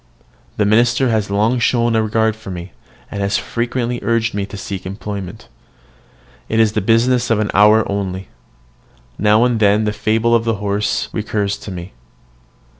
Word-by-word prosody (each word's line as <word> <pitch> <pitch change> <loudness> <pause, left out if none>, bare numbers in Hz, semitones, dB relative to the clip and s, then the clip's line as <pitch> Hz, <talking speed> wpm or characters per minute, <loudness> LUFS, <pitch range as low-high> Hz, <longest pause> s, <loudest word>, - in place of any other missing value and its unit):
The 105 - +2
minister 120 +4 +3
has 110 -3 0
long 110 +5 +1
shown 120 0 +2
a 110 - +3
regard 110 0 +1
for 110 -3 -11
me, 90 -1 -7 0.4
and 100 - -4
has 100 +1 +1
frequently 120 0 -2
urged 115 +2 0
me 100 -1 -2
to 105 - -9
seek 95 -1 -6
employment. 100 -1 -7 1.0
It 110 - +1
is 110 -1 +4
the 110 - 0
business 120 +4 +2
of 115 - +3
an 105 -1 -1
hour 105 +1 +5
only. 95 -2 -4 0.9
Now 105 +2 +4
and 120 -2 +1
then 105 0 +3
the 105 -1 -1
fable 110 +2 +1
of 115 -1 +3
the 115 -1 0
horse 100 0 -1
recurs 105 -2 -1
to 100 - -9
me. 90 0 -8
110 Hz, 170 wpm, -18 LUFS, 100-115 Hz, 1.0 s, hour